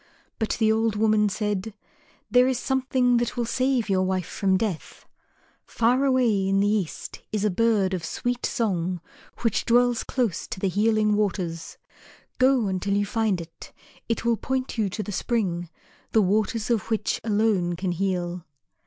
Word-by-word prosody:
But 220 - -1
the 220 -2 +3
old 220 -1 +1
woman 215 -1 +3
said, 205 0 -3 0.6
"There 250 +1 +5
is 260 -2 +1
something 255 -1 +1
that 240 +1 -2
will 240 - 0
save 255 0 0
your 190 -2 +2
wife 185 -1 0
from 190 +1 +1
death. 195 -6 -4 0.6
Far 250 +4 +1
away 240 -7 +2
in 195 0 +2
the 200 - +3
East 205 -6 -2
is 215 -1 -1
a 210 - +2
bird 205 -2 +2
of 180 -3 -3
sweet 245 +8 -3
song 185 -7 -1 0.4
which 230 -4 +1
dwells 245 0 +3
close 240 -9 -1
to - - -6
the 195 - 0
Healing 215 +2 +2
Waters. 180 -5 -2 0.6
Go 255 -2 +4
until 195 +1 -1
you 205 0 +1
find 215 -2 0
it. 165 0 -11 0.4
It 230 0 -1
will 235 -1 +2
point 260 +4 -3
you 215 -4 0
to 210 +3 -4
the 205 - -6
spring, 180 -6 -1 0.4
the 220 - +5
waters 215 +4 0
of 225 -3 0
which 220 -2 -1
alone 205 -5 +1
can 185 +1 -2
heal." 180 -1 -2
215 Hz, 165 wpm, -25 LUFS, 190-235 Hz, 0.6 s, There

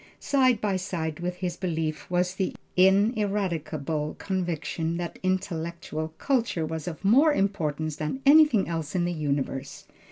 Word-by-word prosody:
Side 255 -5 +3
by 200 -3 +1
side 165 -4 -3
with 180 +1 -4
this 180 -2 -2
belief 160 -4 -3
was 180 0 +1
the 190 0 -2 0.2
ineradicable 185 - +1
conviction 170 -3 -2
that 175 -1 -5
intellectual 170 -3 -2
culture 235 - 0
was 160 0 -5
of 175 +2 -6
more 275 +10 +6
importance 160 - -1
than 155 - -3
anything 285 -7 +6
else 165 -1 -4
in 175 -1 +2
the 175 - -1
universe. 140 -3 -3
175 Hz, 135 wpm, -27 LUFS, 160-195 Hz, 0.2 s, more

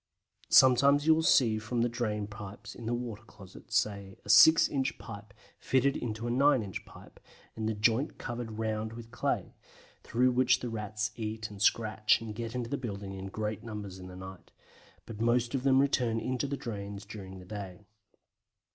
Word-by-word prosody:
Sometimes 140 +3 +6
you 160 - +7
will 160 - +2
see 115 -8 +4
from 115 +2 -2
the - - +3
drain 110 -3 -2
pipes 100 -1 -9
in 115 - -9
the 120 - 0
water 120 -3 -5
closet, 100 -4 -15
say, 100 -2 -1
a - - -11
six 160 +9 +8
inch 135 -2 -2
pipe 105 -1 -10 0.3
fitted 135 +1 +2
into 115 -1 -4
a 120 - -1
nine 130 -1 +4
inch 95 -2 -7
pipe, - - -15 0.4
and 110 0 -2
the 110 - -2
joint 115 +7 +1
covered 120 -3 -5
round 110 0 -2
with 115 0 -10
clay, 120 - -2 0.5
through 125 +2 +2
which 125 0 +3
the 125 - -3
Rats 105 -1 -3
eat 110 -1 -5
and 100 -1 -10
scratch 110 0 +3
and 115 -2 -6
get 115 +1 -5
into 120 -2 -2
the 140 - 0
building 100 -6 -6
in 95 0 -6
great 105 +1 -4
numbers 105 -4 -7
in 90 - -9
the 90 - -10
night, 95 0 -10 0.6
but 110 -1 -8
most 120 +1 +2
of 135 - 0
them 135 0 +4
return 125 -5 +2
into 130 +3 -2
the 140 0 -3
drains 100 -4 -6
during 95 -3 -9
the 90 - -11
day. 100 -1 -8
110 Hz, 190 wpm, -30 LUFS, 105-125 Hz, 0.6 s, six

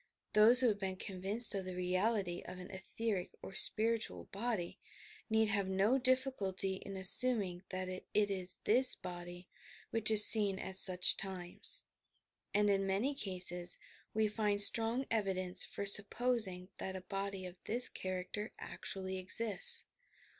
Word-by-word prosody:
Those 225 +4 +5
who 255 - +1
have 205 -2 -4
been 190 -1 -6
convinced 195 +5 -2
of 195 -1 -5
the 185 -1 -8
reality 185 0 -3
of - - -10
an 180 +1 -12
etheric 190 0 -6
or - - -11
spiritual 215 - +1
body, 205 -4 -6 0.5
need 220 -1 0
have 200 -2 -2
no 200 +8 -1
difBciUty 230 -8 -3
in 195 - -11
assnming 190 -1 +5
that 185 0 -5
it 185 0 -9
is 195 -3 -3
this 255 +4 +4
body 175 0 -11 0.4
which 225 -1 +1
is 215 -1 +7
seen 205 -3 +5
at 190 0 -6
such 180 -1 +6
times, 190 - -1 0.7
and 210 0 -1
in 195 -1 -1
many 205 +9 -2
cases 180 -6 -1 0.3
we 220 0 -2
find 210 -1 -3
strong 230 +5 +6
evidence 185 -4 -1
for 200 - -8
supposing 200 -2 +3
that 190 - -6
a 190 - -8
body 195 0 -7
of 180 0 -13
this 245 +3 +3
character 185 +3 -7
actually 190 -1 -8
exists. 195 +1 0
195 Hz, 145 wpm, -32 LUFS, 185-220 Hz, 0.7 s, is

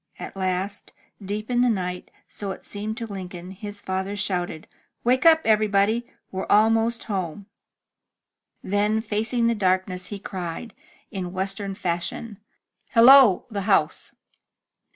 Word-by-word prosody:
At - - -8
last, 190 +1 -3 0.3
deep 210 +4 -4
in 245 0 +3
the 250 - +4
night, 180 -4 -3 0.2
so 200 - -6
it 190 - -7
seemed 215 +2 -5
to 235 - -4
Lincoln, 185 -3 -7
his 205 +1 -7
father 190 +2 -2
shouted: 180 -5 -2 0.4
"Wake 255 +5 +3
up, 320 -1 +7
everybody. 215 +2 +2 0.2
We're 190 0 -4
almost 225 +2 +3
home." 190 -2 -4 1.2
Then, 205 +2 +1
MY - - +2
BOOK - - -17
HOUSE 215 - -25
facing 225 +3 +1
the 235 - +3
darkness, 185 -2 0
he 205 - -5
cried, 190 +2 -6 0.4
in 185 -4 -5
western 195 +1 -2
fashion, 185 +5 -3 0.5
"Hello! 245 -3 +8
the 205 -2 -2
house! 165 -6 +1
200 Hz, 140 wpm, -24 LUFS, 185-225 Hz, 1.2 s, Hello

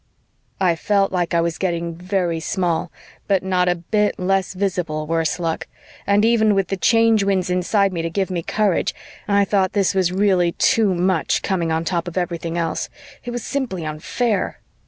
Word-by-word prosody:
I 180 -3 +3
felt 195 +3 +1
like 175 -2 -1
I 170 - +4
was 170 -1 -2
getting 170 -2 -1
very 175 -1 -1
small, 175 0 -1 0.4
but 195 -2 +2
not 180 -1 +1
a 175 - +2
bit 210 +5 0
less 190 0 0
visible, 180 -5 -2
worse 165 0 0
luck, 165 -2 -2 0.4
and 200 +1 +4
even 220 -3 +3
with 195 -2 0
the 195 - 0
Change 225 0 +4
Winds 190 -2 0
inside 195 +2 +1
me 170 - -2
to 165 - -2
give 190 +2 -2
me 175 -2 -1
courage, 205 +1 0 0.3
I 200 -1 +3
thought 195 -2 +1
this 200 -2 +2
was 185 -2 +1
really 185 -3 +2
too 210 -5 +2
much, 180 -1 +1
coming 175 -4 0
on 160 +1 -1
top 170 -1 -1
of 175 - -6
everything 170 -2 -2
else; 165 -1 -2 0.3
it 245 - -6
was 240 -1 -4
simply 230 - -3
unfair. 190 +8 -1
185 Hz, 180 wpm, -21 LUFS, 170-200 Hz, 0.4 s, I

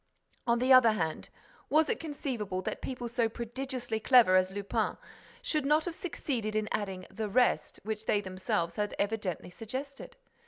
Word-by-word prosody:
—On 235 0 +4
the 255 +2 +5
other 245 -4 +7
hand, 160 -6 -2 0.4
was 315 +1 +4
it - - -1
conceivable 240 - -3
that - - -4
people 250 -2 -4
so 235 -1 +1
prodigiously 240 0 -4
clever 225 -5 +6
as 185 0 +4
Lupin 200 0 -1 0.5
should 305 -2 0
not 300 +3 +3
have 350 - -3
succeeded 250 - -3
in 215 0 0
adding 190 -3 -3
'the 210 +2 -3
rest,' 245 +4 +2
which 215 +1 -4
they 205 - +3
themselves 185 -3 -2
had 210 0 -1
evidently 200 -5 -2
suggested? 260 +8 -7
225 Hz, 160 wpm, -31 LUFS, 200-260 Hz, 0.5 s, other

